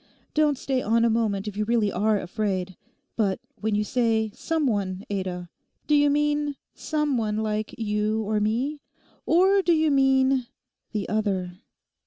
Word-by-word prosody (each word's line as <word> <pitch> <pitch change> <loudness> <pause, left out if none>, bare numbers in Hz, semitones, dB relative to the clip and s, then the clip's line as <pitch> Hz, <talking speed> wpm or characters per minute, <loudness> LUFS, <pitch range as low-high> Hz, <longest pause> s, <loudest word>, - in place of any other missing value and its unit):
Don't 300 -2 +2
stay 260 0 -1
on 230 +1 +2
a 230 - +3
moment 215 -3 0
if 205 - -5
you 210 - 0
really 220 -2 +1
are 210 +2 +1
afraid. 185 -1 -2 0.4
But 200 -4 0 0.2
when 220 -1 -1
you 210 - +1
say 225 -1 +1
"some 325 +3 -1
one" 200 -5 -1
Ada, 185 -3 -3 0.4
do 300 - +1
you 290 0 +5
mean—some 295 -1 -1
one 210 -1 -1
like 215 0 -2
you 215 0 0
or 215 0 0
me; 250 +8 -1 0.5
or 380 +4 +4
do 350 -2 +3
you 315 -1 +3
mean—the 265 -6 0
other? 190 -4 -1
220 Hz, 150 wpm, -25 LUFS, 205-275 Hz, 0.5 s, you